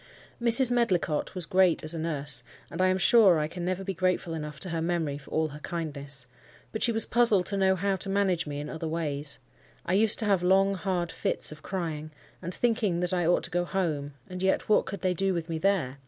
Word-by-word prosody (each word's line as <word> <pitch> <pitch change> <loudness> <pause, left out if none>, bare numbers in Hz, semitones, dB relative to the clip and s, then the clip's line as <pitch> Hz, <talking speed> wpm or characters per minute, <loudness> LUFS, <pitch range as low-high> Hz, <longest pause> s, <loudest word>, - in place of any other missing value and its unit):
Mrs. 240 +2 +5
Medlicott 185 -10 0
was 180 -3 -3
great 185 -1 +3
as 155 +2 +2
a 165 - -4
nurse, 150 -6 -2 0.3
and 165 - -3
I 185 - +4
am 185 0 +2
sure 190 -2 +6
I 150 0 0
can 175 +2 -7
never 185 +2 -2
be 195 0 -3
grateful 185 -2 -1
enough 150 -2 -6
to 185 - -2
her 165 -1 -2
memory 160 -4 -1
for 140 - -16
all 160 0 0
her 150 +1 -10
kindness. 145 -5 -5 0.5
But 220 - -5
she 240 - +3
was 225 0 +1
puzzled 225 -6 +4
to 200 - -2
know 190 -1 +3
how 195 +1 -1
to 195 - -2
manage 190 -5 +1
me 145 -1 -4
in 145 - -5
other 160 0 -5
ways. 150 -3 +1 0.5
I 180 - -1
used 215 +2 +4
to 220 - +2
have 200 -4 +2
long, 195 +2 +3
hard 180 -2 -2
fits - - -1
of 155 0 -11
crying; 160 -4 -4 0.3
and, 180 0 -5
thinking 215 -5 0
that 180 0 0
I 175 -2 +1
ought 175 - +2
to - - -4
go 175 0 0
home—and 155 -2 -4
yet 190 0 +1
what 215 - +3
could 195 +1 -6
they 185 -1 +1
do 190 +1 0
with 170 0 -4
me 165 -1 -3
there? 160 -9 0
175 Hz, 230 wpm, -27 LUFS, 155-195 Hz, 0.5 s, sure